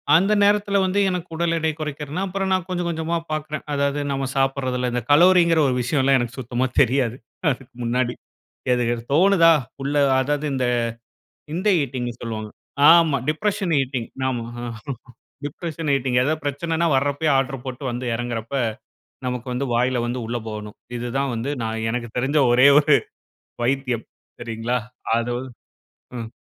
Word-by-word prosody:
அந்த 195 Hz, +5 st, +4 dB
நேரத்தில 205 Hz, -1 st, +3 dB
வந்து 190 Hz, +2 st, +1 dB
எனக்கு 180 Hz, -1 st, -3 dB
உடல் 170 Hz, 0 st, 0 dB
எடை 160 Hz, 0 st, +1 dB
குறைக்கிறதுன்னா, 150 Hz, +3 st, -4 dB
அப்புறம் 190 Hz, 0 st, -2 dB
நான் 185 Hz, -2 st, 0 dB
கொஞ்சம் 175 Hz, -1 st, -2 dB
கொஞ்சமா 165 Hz, +1 st, -2 dB, 0.2 s
பாக்கிறேன். 155 Hz, -1 st, -3 dB
அதாவது 140 Hz, 0 st, 0 dB
நம்ம 135 Hz, 0 st, -1 dB
சாப்பிடுறதில, 130 Hz, -2 st, 0 dB
இந்த 125 Hz, -, 0 dB
கலோங்குற 170 Hz, +1 st, +6 dB
ஒரு 125 Hz, -, +1 dB
விஷயம் 135 Hz, +3 st, +1 dB
எல்லா 135 Hz, 0 st, +4 dB
எனக்கு 120 Hz, 0 st, -3 dB
சுத்தமா 125 Hz, +1 st, -1 dB, 0.2 s
தெரியாது. 125 Hz, -2 st, +2 dB, 0.4 s
அதுக்கு 130 Hz, 0 st, -7 dB
முன்னாடி. 120 Hz, +1 st, 0 dB, 0.6 s
எது 125 Hz, 0 st, +1 dB
எது 115 Hz, -, -5 dB
தோணுதா? 170 Hz, 0 st, +6 dB, 0.3 s
உள்ள 145 Hz, +2 st, -2 dB, 0.2 s
அதாவது 145 Hz, +3 st, 0 dB
இந்த, 130 Hz, -1 st, 0 dB, 0.9 s
இந்த 190 Hz, +5 st, 0 dB
ஈட்டிங்ன்னு 120 Hz, -3 st, -4 dB
சொல்வாங்க. 110 Hz, -2 st, -5 dB, 0.4 s
ஆமா. 165 Hz, -4 st, +6 dB
Depression 185 Hz, +2 st, 0 dB
eating. 125 Hz, -3 st, -3 dB, 0.2 s
ஆமா 120 Hz, -3 st, -2 dB, 1.0 s
டிப்ரஷன் 160 Hz, 0 st, -4 dB
ஈட்டிங். 125 Hz, -1 st, 0 dB
ஏதாவது 155 Hz, +3 st, -1 dB
பிரச்சனைன்னா, 165 Hz, +4 st, 0 dB
வர்ரப்பயே 145 Hz, +3 st, +1 dB
ஆர்டர் 135 Hz, -1 st, -2 dB
போட்டு 130 Hz, +2 st, -6 dB
வந்து 125 Hz, +1 st, -4 dB
எறங்குறப்ப, 120 Hz, +1 st, -4 dB, 0.7 s
நமக்கு 125 Hz, 0 st, -3 dB
வந்து 135 Hz, +2 st, -1 dB
வாயில 125 Hz, 0 st, +1 dB
வந்து 125 Hz, +1 st, -3 dB
உள்ள 120 Hz, +1 st, -2 dB
போகணும். 105 Hz, -1 st, -7 dB, 0.2 s
இது 120 Hz, +1 st, -4 dB
தான் 135 Hz, -2 st, 0 dB
வந்து 130 Hz, +6 st, -2 dB
நான் 110 Hz, 0 st, -3 dB
எனக்கு 120 Hz, -1 st, -3 dB
தெரிந்த 140 Hz, +4 st, +2 dB
ஒரே 125 Hz, +3 st, +7 dB
ஒரு 145 Hz, -1 st, +5 dB, 0.7 s
வைத்தியம் 125 Hz, -3 st, -1 dB, 0.3 s
சரிங்களா? 115 Hz, +1 st, -2 dB, 0.4 s
அதாவது 120 Hz, +2 st, -3 dB, 0.7 s
ம். 115 Hz, -1 st, -6 dB
135 Hz, 150 wpm, -22 LUFS, 120-160 Hz, 1.0 s, ஒரே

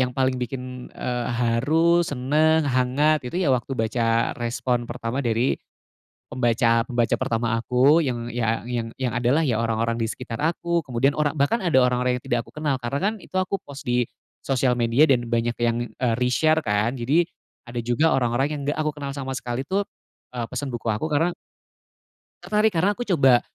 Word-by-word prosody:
yang 125 Hz, -1 st, -1 dB
paling 130 Hz, -1 st, +1 dB
bikin, 125 Hz, 0 st, -6 dB
eee, 125 Hz, -1 st, -3 dB
haru, 135 Hz, +9 st, +2 dB
seneng, 155 Hz, +2 st, +2 dB
hangat, 140 Hz, +4 st, +2 dB
itu -, -, -5 dB
ya 175 Hz, -7 st, +2 dB
waktu 130 Hz, +1 st, -1 dB
baca 115 Hz, +1 st, +1 dB
respon 120 Hz, 0 st, -1 dB
pertama 120 Hz, +2 st, -3 dB
dari 120 Hz, 0 st, 0 dB, 0.7 s
pembaca-pembaca 120 Hz, -1 st, +2 dB
pertama 115 Hz, 0 st, 0 dB
aku 130 Hz, +7 st, +4 dB
yang, 120 Hz, -6 st, -2 dB
iya, 115 Hz, -1 st, -1 dB
yang 115 Hz, -1 st, -4 dB
yang 130 Hz, -2 st, -2 dB
adalah 125 Hz, +6 st, +2 dB
ya 120 Hz, -7 st, +1 dB
orang 115 Hz, -1 st, 0 dB
orang 115 Hz, 0 st, -1 dB
di 115 Hz, -, 0 dB
sekitar 115 Hz, 0 st, -6 dB
aku. 170 Hz, +2 st, 0 dB
Kemudian 130 Hz, +3 st, +2 dB
orang 150 Hz, 0 st, -1 dB
bahkan 145 Hz, +11 st, +1 dB
ada 175 Hz, -6 st, 0 dB
orang 125 Hz, 0 st, +2 dB
orang 125 Hz, 0 st, +1 dB
yang 125 Hz, -, -7 dB
tidak 120 Hz, -, 0 dB
aku -, -, -18 dB
kenal 150 Hz, -3 st, -1 dB
karena 130 Hz, +3 st, -2 dB
kan 205 Hz, +2 st, +2 dB
itu 185 Hz, -, -14 dB
aku 185 Hz, +1 st, 0 dB
post 140 Hz, -5 st, -11 dB
di 125 Hz, -2 st, +1 dB, 0.3 s
sosial 130 Hz, -2 st, +1 dB
media 120 Hz, +5 st, +3 dB
dan 125 Hz, -5 st, +2 dB
banyak 115 Hz, 0 st, 0 dB
yang, 120 Hz, 0 st, +1 dB
eee, 120 Hz, -3 st, 0 dB
reshare 155 Hz, +6 st, +2 dB
kan. 105 Hz, +4 st, 0 dB
Jadi 145 Hz, +8 st, +2 dB, 0.4 s
ada 120 Hz, 0 st, -4 dB
juga 120 Hz, +8 st, +2 dB
orang 120 Hz, -3 st, +1 dB
orang 135 Hz, +4 st, +1 dB
yang 150 Hz, -1 st, -4 dB
enggak 145 Hz, +2 st, -2 dB
aku 150 Hz, -1 st, -1 dB
kenal 140 Hz, -1 st, -5 dB
sama 135 Hz, -1 st, -5 dB
sekali 125 Hz, +2 st, -4 dB
tuh, 195 Hz, +3 st, +1 dB, 0.5 s
eee, 120 Hz, -2 st, -4 dB
pesen 140 Hz, +3 st, -4 dB
buku 120 Hz, -1 st, -5 dB
aku 110 Hz, +9 st, -1 dB
karena 165 Hz, +4 st, +1 dB, 1.1 s
Tertarik 210 Hz, -1 st, +1 dB
karena 180 Hz, +5 st, +3 dB
aku 240 Hz, +4 st, -5 dB
coba 135 Hz, -, +5 dB
125 Hz, 185 wpm, -24 LUFS, 120-150 Hz, 1.1 s, coba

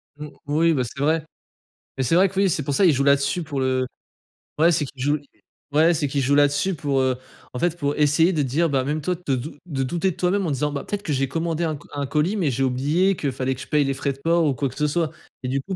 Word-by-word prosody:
Mmh, 150 Hz, 0 st, -8 dB, 0.2 s
oui, 160 Hz, +3 st, +3 dB
bah, 130 Hz, -3 st, +1 dB
c'est 135 Hz, +3 st, -8 dB
vrai. 155 Hz, +1 st, +1 dB, 0.7 s
Mais, 130 Hz, -, 0 dB
c'est 145 Hz, +7 st, +2 dB
vrai 190 Hz, +1 st, +5 dB
que, 195 Hz, +1 st, -3 dB
oui, 195 Hz, -1 st, +4 dB
c'est 150 Hz, -3 st, -1 dB
pour 140 Hz, -, -2 dB
ça, 195 Hz, -, +3 dB
ils 160 Hz, -, +6 dB
jouent 140 Hz, +1 st, +1 dB
là-dessus 140 Hz, +4 st, +2 dB
pour 145 Hz, -3 st, -4 dB
le 130 Hz, -1 st, +1 dB, 0.7 s
ouais, 170 Hz, +2 st, +5 dB
c'est 150 Hz, -2 st, +1 dB
qu'ils 130 Hz, -1 st, -10 dB
jouent 145 Hz, +2 st, +2 dB
l -, -, -15 dB, 0.6 s
ouais, 165 Hz, +2 st, +5 dB
c'est 150 Hz, -2 st, 0 dB
qu'ils 140 Hz, 0 st, -1 dB
jouent 140 Hz, +2 st, +2 dB
là-dessus, 145 Hz, +7 st, +2 dB
pour, 140 Hz, -3 st, 0 dB
heu, 130 Hz, -1 st, +1 dB, 0.4 s
en 125 Hz, -, -4 dB
fait, 175 Hz, -1 st, 0 dB
pour 145 Hz, -2 st, -1 dB
essayer 150 Hz, +5 st, +3 dB
de 150 Hz, -, +1 dB
dire 150 Hz, +5 st, +1 dB
bah, 135 Hz, -2 st, +1 dB
même 150 Hz, +3 st, -2 dB
toi 180 Hz, +4 st, -1 dB
de 135 Hz, -, +2 dB
dou 140 Hz, +6 st, -6 dB
de 135 Hz, -6 st, -2 dB
douter 175 Hz, +8 st, 0 dB
de -, -, -10 dB
toi-même 185 Hz, +2 st, 0 dB
en 155 Hz, -, -1 dB
disant: 145 Hz, +2 st, -1 dB
«Bah, 140 Hz, -, -4 dB
peut-être 205 Hz, 0 st, -4 dB
que 150 Hz, -, -2 dB
j'ai 135 Hz, 0 st, 0 dB
commandé 165 Hz, +3 st, -2 dB
un 155 Hz, -2 st, -1 dB
co 145 Hz, -, -14 dB
un 145 Hz, -1 st, -2 dB
colis? 155 Hz, +9 st, 0 dB
Mais, 165 Hz, -9 st, +1 dB
j'ai 135 Hz, +2 st, -1 dB
oublié 150 Hz, +10 st, +2 dB
qu'il 140 Hz, -4 st, -2 dB
fallait 130 Hz, 0 st, -2 dB
que 130 Hz, -, -10 dB
je -, -, -8 dB
paye 150 Hz, -2 st, +2 dB
les 135 Hz, -, 0 dB
frais 140 Hz, 0 st, -2 dB
de 135 Hz, -, -18 dB
port 165 Hz, 0 st, +3 dB
ou 145 Hz, -, +2 dB
quoi 130 Hz, +2 st, -1 dB
que -, -, -13 dB
ce 150 Hz, 0 st, +1 dB
soit» 160 Hz, +1 st, 0 dB, 0.3 s
et -, -, -2 dB
du 135 Hz, +1 st, -1 dB
coup, 190 Hz, +5 st, -5 dB
145 Hz, 290 wpm, -23 LUFS, 135-165 Hz, 0.7 s, ils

